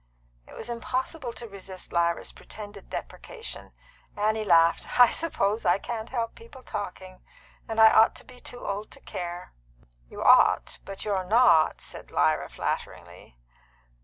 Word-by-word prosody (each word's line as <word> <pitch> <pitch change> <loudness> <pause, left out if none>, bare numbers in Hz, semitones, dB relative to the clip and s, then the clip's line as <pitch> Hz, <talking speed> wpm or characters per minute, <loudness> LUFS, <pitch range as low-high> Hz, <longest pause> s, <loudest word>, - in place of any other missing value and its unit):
It - - -13
was 220 - -7
impossible 255 +3 -3
to 235 - -7
resist 195 -2 -9
Lyra's 170 0 0
pretended 205 -2 -11
deprecation. 475 -2 -8 0.5
Annie 215 +1 +1
laughed. 170 +2 +3
"I 245 - +8
suppose 220 -10 -1
I 175 +2 +4
can't 225 +2 -5
help 230 -3 -2
people's 290 - -14
talking, 185 -2 -6 0.5
and 225 0 -3
I 220 0 +9
ought 220 - +5
to - - -12
be 250 -1 -14
too 245 - -9
old 205 +2 -4
to - - -12
care." 175 0 -6 0.6
"You - - -6
ought, - - +5
but 195 +1 -7
you're 195 -3 0
not," 215 -6 +4
said - - -7
Lyra - - +1
flatteringly. - - -5
215 Hz, 145 wpm, -27 LUFS, 185-240 Hz, 0.6 s, I